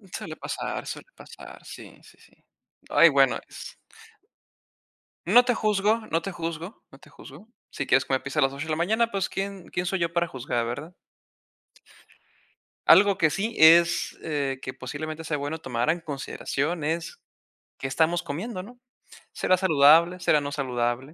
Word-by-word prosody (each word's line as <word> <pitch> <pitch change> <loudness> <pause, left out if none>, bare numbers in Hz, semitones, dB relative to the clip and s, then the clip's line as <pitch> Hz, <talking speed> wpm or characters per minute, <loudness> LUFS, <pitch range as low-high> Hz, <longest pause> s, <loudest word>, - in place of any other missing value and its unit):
Suele - - -7
pasar, - - -5
suele - - -8
pasar, - - -13
sí, - - -12
sí, - - -19
sí. - - -22 0.6
Ay, - - +6
bueno - - +3
es - - -10 1.5
No 245 - +6
te 245 -1 +1
juzgo, 215 +1 +1
no 165 +1 +1
te 195 - -5
juzgo, 170 +2 -6
no 135 - -15
te - - -18
juzgo. 160 +11 -14 0.2
Si 140 - -4
quieres 135 +1 +3
comer 130 -1 -1
pizza 140 +2 -3
a - - +4
las 135 0 +2
8 145 +3 -5
de - - -3
la - - +1
mañana, 220 +7 +1
pues 195 -2 -2
quién 195 -1 -5
quién 180 +1 -3
soy 190 +1 -1
yo 170 0 -1
para 170 0 +1
juzgar, 120 -4 -3
¿verdad? 145 +9 -6 1.9
Algo 200 0 +6
que 160 -3 +3
sí 220 +8 -3
es, 170 +2 +5
eh, 140 -4 -2
que 130 - -6
posiblemente 155 +5 -6
sea 150 -1 -2
bueno 145 +3 -4
tomar 120 -1 -2
en 170 +2 +1
consideración 145 +1 -4
es 165 +2 -3 0.6
qué 135 - -4
estamos 165 +5 +1
comiendo, 185 +6 -5
¿no? 245 +4 -14 0.5
¿Será 185 - +2
saludable? 165 +1 +5
¿Será 155 -4 +3
no 145 0 -5
saludable? 120 -4 -1
160 Hz, 165 wpm, -25 LUFS, 140-185 Hz, 1.9 s, Ay